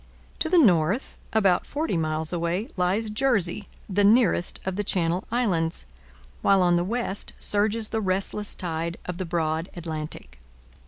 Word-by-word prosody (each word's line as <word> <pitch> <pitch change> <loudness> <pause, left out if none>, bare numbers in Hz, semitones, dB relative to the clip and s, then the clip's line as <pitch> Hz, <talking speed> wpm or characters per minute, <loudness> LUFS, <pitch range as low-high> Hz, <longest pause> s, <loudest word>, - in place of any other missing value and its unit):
To 320 - 0
the 360 - +4
north, 195 - +3 0.2
about 195 -5 +3
forty 295 - -2
miles 160 0 -1
away, 175 +5 -1
lies 195 +4 0
Jersey, 210 -6 +1 0.2
the 205 +1 +1
nearest 215 -4 +3
of 190 -1 -2
the 205 - -1
Channel 180 -2 0
Islands, 185 -9 0 0.6
while 195 -2 +4
on 175 -1 +4
the 175 - +2
west 210 0 -2
surges 215 +2 +1
the 220 - -1
restless 195 +2 -1
tide 170 -1 -3
of 180 0 -5
the 185 - -2
broad 165 0 -1
Atlantic. 155 - -6
185 Hz, 150 wpm, -25 LUFS, 170-210 Hz, 0.6 s, the